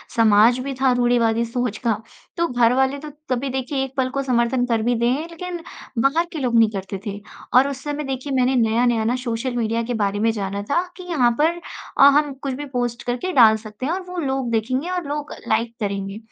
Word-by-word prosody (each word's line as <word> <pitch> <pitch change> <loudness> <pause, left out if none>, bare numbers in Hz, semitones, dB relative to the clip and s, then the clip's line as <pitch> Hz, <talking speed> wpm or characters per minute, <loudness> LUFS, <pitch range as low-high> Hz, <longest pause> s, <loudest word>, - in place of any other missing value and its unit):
समाज 225 +2 +5
भी 270 +1 -4
था 265 -1 +4
रूढ़िवादी 235 -2 +2
सोच 235 -2 -2
का, 225 - +3 0.4
तो 340 0 +2
घरवाले 255 +3 +2
तो 300 +1 -8 0.2
कभी 260 +1 -1
देखिए 265 +1 -2
1 270 - -6
पल 255 -1 +1
को - - +2
समर्थन 245 -1 +1
कर 230 -2 0
भी 245 +1 +2
दें, 250 +7 0
लेकिन 345 +1 -6 0.4
बाहर 310 +5 +2
के 320 - -5
लोग 245 -4 0
नहीं 225 -1 +5
करते 195 -1 -5
थे। 200 - -3 0.4
और 270 +2 +6
उस 275 -1 -6
समय 295 0 -3
देखिए 270 +1 -4
मैंने 255 +1 +2
नया-नया 230 0 +2
ना 240 +3 +1
सोशल 240 +1 -2
मीडिया 230 0 0
के 245 - -3
बारे 200 +1 -1
में 225 - +2
जाना 200 -2 -3
था 345 - +3 0.2
कि 365 - -8
यहाँ 250 -7 +3
पर 330 +3 +2 0.4
अ, - - +8
हम 290 0 +4
कुछ 270 0 -5
भी 290 +3 -5
पोस्ट 240 -1 -2
करके 245 +10 -2
डाल 225 -4 +7
सकते 215 +3 -8
हैं 315 - 0
और 375 - -2
वो 360 - -6
लोग 265 -3 -1
देखेंगे 255 +8 -1
और 360 -4 -3
लोग 295 +1 -4 0.2
लाइक 230 +1 0
करेंगे। 200 -1 -3
250 Hz, 215 wpm, -22 LUFS, 230-275 Hz, 0.4 s, अ